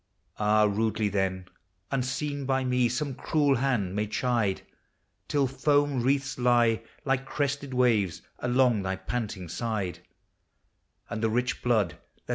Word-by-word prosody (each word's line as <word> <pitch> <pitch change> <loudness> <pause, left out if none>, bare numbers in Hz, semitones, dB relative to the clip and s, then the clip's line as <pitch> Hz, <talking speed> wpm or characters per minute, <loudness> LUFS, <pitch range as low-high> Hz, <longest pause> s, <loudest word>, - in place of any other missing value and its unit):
Ah! 105 0 +4
rudely 105 0 +1
then, 95 -2 -1 0.5
unseen 140 +2 -2
by 135 0 +1
me, 125 -1 +2
some 135 +3 -2
cruel 145 0 +1
hand 115 -8 0
may 105 +1 0
chide, 115 -3 0 0.6
Till 145 -2 +2
foam 145 0 +1
wreaths 135 +1 0
lie, 120 -2 +3 0.2
like 135 -1 +1
crested 140 0 -2
waves, 115 -8 +2 0.2
along 125 -3 +3
thy 95 0 -2
panting 100 -2 -4
side: 100 0 -3 1.1
And 115 -2 -4
the 115 - +2
rich 125 +3 -1
blood 110 -10 +1 0.3
that - - -28
120 Hz, 130 wpm, -28 LUFS, 105-135 Hz, 1.1 s, Ah